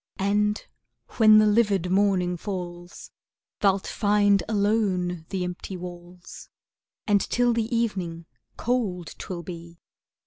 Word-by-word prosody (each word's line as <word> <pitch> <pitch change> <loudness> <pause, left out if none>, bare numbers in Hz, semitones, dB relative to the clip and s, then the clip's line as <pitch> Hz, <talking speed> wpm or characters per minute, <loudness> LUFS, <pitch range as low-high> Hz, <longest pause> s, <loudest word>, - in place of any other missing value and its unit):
And 210 +2 0 0.5
when 215 -1 +7
the 215 - +6
livid 205 -4 +2
morning 190 -2 +2
falls, 175 -2 -7 0.5
Thou'lt 195 -2 +2
find 205 -2 +2
alone 195 -6 0
the 190 -2 -2
empty 180 +1 -6
walls, 175 0 -10 0.6
And 205 -2 +3
till 245 0 +1
the 230 +1 -1
evening, 180 -8 -2 0.3
cold 210 -9 -2
'twill 175 -2 -6
be. 170 0 -9
195 Hz, 110 wpm, -25 LUFS, 180-210 Hz, 0.6 s, when